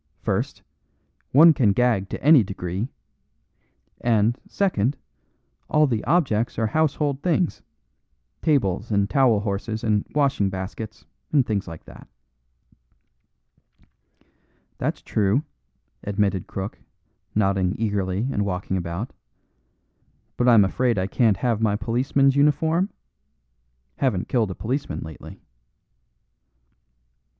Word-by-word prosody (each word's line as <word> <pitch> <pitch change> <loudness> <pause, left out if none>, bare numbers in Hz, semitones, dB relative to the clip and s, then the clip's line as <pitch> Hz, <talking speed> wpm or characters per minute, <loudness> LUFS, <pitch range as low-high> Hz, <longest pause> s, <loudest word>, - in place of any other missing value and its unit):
First, - - -2 0.7
one 160 +4 +8
can 110 -8 +3
gag 115 -5 +1
to - - -6
any 150 -2 +7
degree; 95 +2 -4 1.2
and, 115 -1 +3
second, 145 - 0 0.7
all 150 0 +4
the 115 -6 -1
objects 135 -9 +1
are 115 - +1
household 145 +2 0
things 175 -1 0 0.8
tables 115 - +1
and 100 -2 +1
towel 120 -4 +3
horses 105 +2 -3
and 105 -3 +1
washing 140 -9 +2
baskets, 95 +3 -7 0.3
and 140 -4 +3
things 100 -3 -2
like 80 -2 -9
that." - - -14 2.7
"That's - - -2
true," 105 +7 +1 0.6
admitted 100 -2 -1
Crook, 95 +1 -6 0.6
nodding 95 -3 +1
eagerly 100 0 -1
and 105 - 0
walking 95 -1 -2
about. 85 +6 -4 1.2
"But 120 - +1
I'm 115 -5 +7
afraid 120 +4 0
I 95 - 0
can't 105 0 +2
have 115 +1 0
my 105 -2 +2
policeman's 130 +5 +1
uniform? 160 +6 +2 1.1
Haven't 105 -9 0
killed 115 -5 +1
a 95 - -5
policeman 135 +6 -3
lately." 80 -1 -10
110 Hz, 105 wpm, -23 LUFS, 100-135 Hz, 2.7 s, one